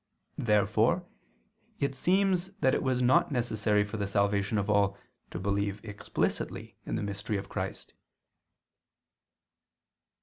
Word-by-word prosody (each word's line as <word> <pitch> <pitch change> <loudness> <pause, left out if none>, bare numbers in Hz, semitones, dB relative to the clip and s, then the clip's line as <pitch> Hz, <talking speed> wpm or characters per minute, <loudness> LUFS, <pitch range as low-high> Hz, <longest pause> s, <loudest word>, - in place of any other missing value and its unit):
Therefore 110 - +2 0.7
it 140 -1 0
seems 185 +5 +2
that 130 - +4
it - - +1
was 130 -1 +1
not 125 +4 +4
necessary 110 -5 +1
for 105 +2 -5
the 100 -1 -1
salvation 100 +1 +1
of 100 -1 0
all 100 -1 +2 0.3
to - - -6
believe 100 +2 -1
explicitly 105 -2 -3
in - - -1
the - - -2
mystery 100 +1 -2
of 100 0 -6
Christ. - - -5
105 Hz, 125 wpm, -30 LUFS, 100-130 Hz, 0.7 s, that